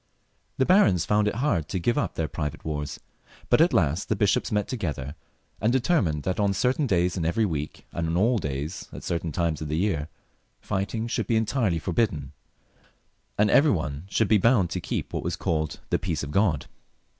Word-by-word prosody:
The 130 - +3
barons 115 - +4
found 105 +2 +2
it 105 - -1
hard 110 - 0
to - - -2
give 105 +7 +1
up 145 - -1
their 80 - -1
private 75 0 -5
wars; 75 -2 -4 0.5
but - - +6
at 170 - +5
last 80 +2 +1
the 110 - +2
bishops 105 +5 +1
met 105 -1 0
to 130 - -2
gether 75 - -4 0.5
and 110 +3 +3
determined 115 - +1
that 95 +1 -2
on 100 -1 +2
certain 130 +8 +1
days 90 -2 +1
in 85 - -1
every 85 +7 +1
week, 75 -5 -4
and 85 -1 -2
on 85 +1 0
all 115 +5 +3
days 75 +2 -4
at - - -9
certain 85 -1 -2
times 80 -1 -1
of 80 - -3
the 75 +1 -1
year, 85 -6 0 0.5
fighting 105 +3 -2
should - - -2
be 115 - +2
entirely 110 -4 +1
forbidden, 80 - -1 1.1
and 105 0 +3
every 150 +2 +6
one 80 - -2
should 110 +2 +2
be 105 0 +4
bound 100 -5 +3
to 90 - -2
keep - - -4
what - - -1
was - - -2
called 80 -2 -2
The - - +2
Peace 80 -6 -2
of 75 - -5
God. 90 -4 +2
90 Hz, 200 wpm, -26 LUFS, 80-110 Hz, 1.1 s, but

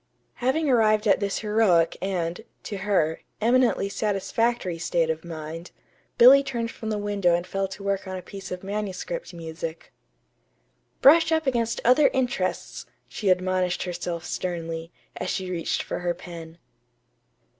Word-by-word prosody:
Having 265 +6 +1
arrived 215 -4 +3
at 200 - +4
this 200 -1 -1
heroic 210 -6 +3
and 180 -2 -2 0.2
(to 205 - -5
her) 190 -5 0 0.2
eminently 235 -2 +3
satisfactory 205 -1 -1
state 165 -1 +1
of 160 0 -5
mind, 165 0 -7 0.5
Billy 255 +4 +9
turned 235 -4 -3
from 220 - -6
the 215 - -1
window 200 -4 +1
and 175 +1 -2
fell 195 +1 -2
to 195 +1 -9
work 200 -1 -1
on 185 0 -4
a - - -6
piece 195 +1 -9
of 180 0 -5
manuscript 210 - -4
music. 165 -1 -7 1.1
"'Brush 320 +3 +7
up 320 -1 +2
against 235 -3 0
other 255 +4 +6
interests,'" 245 - -2 0.2
she 195 - -2
admonished 185 0 +1
herself 175 -1 -4
sternly, 165 -2 -4 0.3
as 180 - -3
she 185 -1 -3
reached 170 -2 -1
for - - -4
her 175 -1 -1
pen. 165 -2 -10
195 Hz, 145 wpm, -25 LUFS, 175-225 Hz, 1.1 s, Billy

